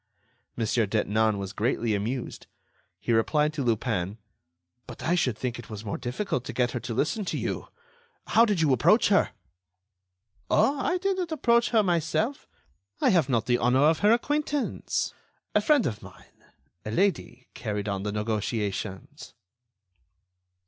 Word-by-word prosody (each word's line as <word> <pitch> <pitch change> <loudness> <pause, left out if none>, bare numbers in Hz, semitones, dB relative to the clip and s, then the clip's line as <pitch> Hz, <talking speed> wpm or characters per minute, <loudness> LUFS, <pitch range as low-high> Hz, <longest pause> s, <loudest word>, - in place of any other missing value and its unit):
Mon. 115 - 0
Detinan 110 -1 +1
was 100 -1 -5
greatly 115 0 0
amused. 115 +5 -3 0.5
He - - -2
replied 150 +7 +2
to 145 -3 -2
Lupin: 105 -4 -1 0.7
"But - - -9
I 170 - +1
should 130 -10 +1
think 120 -1 -3
it 120 - -10
was 110 0 -7
more 100 - -3
difficult 125 - -2
to - - -5
get 125 -2 +1
her - - -3
to 115 - -5
listen 185 - 0
to - - -2
you. - - -3 0.6
How 230 - +5
did 205 -7 +1
you 150 -4 +4
approach 125 - +4
her?" - - +4 1.2
"Oh! 280 +1 +3
I 355 +6 +1
didn't 370 -2 -1
approach 235 -6 +2
her 225 -3 +3
myself. 175 - 0 0.5
I - - +3
have 165 -7 +3
not 115 -4 +1
the 120 -1 +2
honor 125 +3 +3
of 155 +1 +4
her 205 +1 +4
acquaintance. 290 +3 -1 0.4
A - - +3
friend 295 -5 +3
of 105 -5 -3
mine, - - -16 0.4
a - - -5
lady, 125 - -1
carried 105 -2 -4
on 100 -1 -2
the 105 +1 -3
negotiations." 105 +4 -3
125 Hz, 155 wpm, -27 LUFS, -, 1.2 s, How